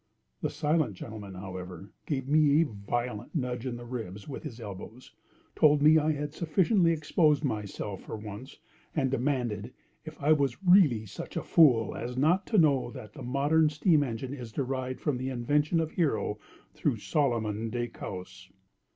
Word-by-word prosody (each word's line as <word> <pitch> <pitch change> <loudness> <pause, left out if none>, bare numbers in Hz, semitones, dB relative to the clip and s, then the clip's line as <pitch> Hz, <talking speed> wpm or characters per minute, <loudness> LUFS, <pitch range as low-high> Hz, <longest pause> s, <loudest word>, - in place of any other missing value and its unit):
The - - 0
silent 150 - 0
gentleman, 105 -1 -8
however, 95 0 -8 0.2
gave 135 -3 -2
me 150 0 +4
a 165 - +4
violent 115 +1 -4
nudge 125 -3 -2
in 125 - -3
the 120 0 -8
ribs 110 -5 -6
with 140 - -6
his 115 - -8
elbows—told 125 +7 -2
me 155 +1 +7
I 155 +1 +1
had 145 0 -4
sufficiently 170 +3 +2
exposed 155 -1 +2
myself 105 -5 -3
for - - -7
once—and 125 +6 -6
demanded 125 -4 -1 0.3
if 155 0 -10
I 145 +2 +2
was 140 +1 +1
really 175 - +5
such 95 - -7
a - - -2
fool 125 -10 +4
as 125 +2 -5
not 175 +8 +2
to 220 - +1
know 145 -8 +4
that 105 -3 -10
the - - -10
modern 145 +5 +2
steam 150 +1 +3
engine 125 0 -3
is 120 -5 -7
derived 130 +1 -3
from 140 -5 -1
the 130 +1 -2
invention 145 +6 +1
of 160 -1 -1
Hero, 110 - 0 0.3
through - - 0
Solomon 115 -6 0
de 120 +1 -2
Caus. 95 -3 -8
130 Hz, 160 wpm, -29 LUFS, 110-150 Hz, 0.3 s, me